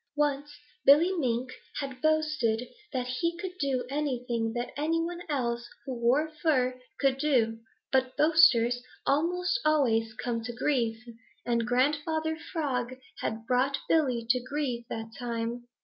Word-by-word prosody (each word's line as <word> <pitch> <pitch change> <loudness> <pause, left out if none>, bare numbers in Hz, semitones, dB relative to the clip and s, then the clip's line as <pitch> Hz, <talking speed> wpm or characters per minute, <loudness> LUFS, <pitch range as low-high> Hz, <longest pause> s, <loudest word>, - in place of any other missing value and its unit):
Once 295 0 0 0.3
Billy 305 +6 +7
Mink 255 -6 -1 0.3
had 270 -3 -5
boasted 305 -7 +1 0.2
that 255 -3 -1
he 335 +7 -1
could 360 0 -5
do 265 -3 0
anything 250 -5 -1
that 240 +1 -3
any 320 +3 0
one 345 +1 -3
else 240 -4 -1 0.2
who 265 - -3
wore 250 +6 +2
fur 255 -6 +1 0.2
could 270 -1 +2
do, 235 -7 +2 0.3
but 260 -1 +1
boasters 245 -7 +5 0.2
almost 360 - +1
always 225 -8 +2
come 230 0 -2
to 240 +1 -5
grief, 235 -3 0 0.5
and 235 -1 +1
Grandfather 300 +5 +1 0.2
Frog 255 -7 -1 0.2
had 220 +1 -3
brought 255 +3 +2
Billy 255 -8 +2
to 250 0 +1
grief 255 -3 -3
that 225 0 -5
time. 235 0 -3
260 Hz, 135 wpm, -29 LUFS, 240-300 Hz, 0.5 s, Billy